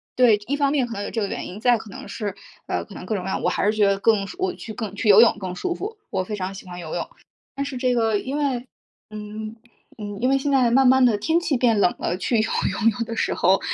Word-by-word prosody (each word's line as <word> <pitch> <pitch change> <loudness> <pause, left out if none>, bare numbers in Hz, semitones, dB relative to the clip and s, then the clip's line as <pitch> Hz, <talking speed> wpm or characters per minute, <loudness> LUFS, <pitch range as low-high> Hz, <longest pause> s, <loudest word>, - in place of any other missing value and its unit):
对， 240 -4 +5
一 285 - 0
方 280 -1 +1
面 265 -5 +1
可 230 - -6
能 205 - -4
有 - - -5
这 225 - -2
个 200 - 0
原 - - -5
因， 195 +4 -8
再 240 0 +4
可 220 -1 -11
能 - - -9
是， 205 -3 -4 0.3
呃， - - -2
可 - - -13
能 - - -8
各 220 - -2
种 185 - -3
各 190 - -4
样， - - -2
我 - - +3
还 - - -1
是 210 - +3
觉 205 - +4
得 195 0 +2
更 200 -2 +2
我 375 0 0
去 220 - -8
更 210 -4 -5
去 215 - -2
游 205 +3 +9
泳 235 - +5
更 185 -2 -5
舒 355 - -2
服， 425 +3 -6
我 185 - -1
非 210 +2 -5
常 190 0 -4
喜 190 - -10
欢 180 -1 -8
游 160 -1 -6
泳， 175 - -3 0.5
但 280 - -2
是 275 -2 -5
这 250 -1 +1
个 225 -3 +2
因 265 +6 -4
为 260 -4 -1 0.4
嗯， 215 +1 -7 0.4
嗯， 205 -1 -6
因 250 - +2
为 270 - +4
现 280 +1 -1
在 250 -4 +4
慢 265 +1 +5
慢 260 0 +6
地 230 -4 +4
天 325 +9 +2
气 315 -5 0
变 235 -4 +3
冷 180 - +3
了， 180 - -1
去 230 +4 0
游 220 - 0 0.2
泳 230 0 +2
有 230 - -1
的 230 - -5
时 - - 0
候 190 +2 +3
225 Hz, 310 characters per minute, -23 LUFS, 200-255 Hz, 0.5 s, 游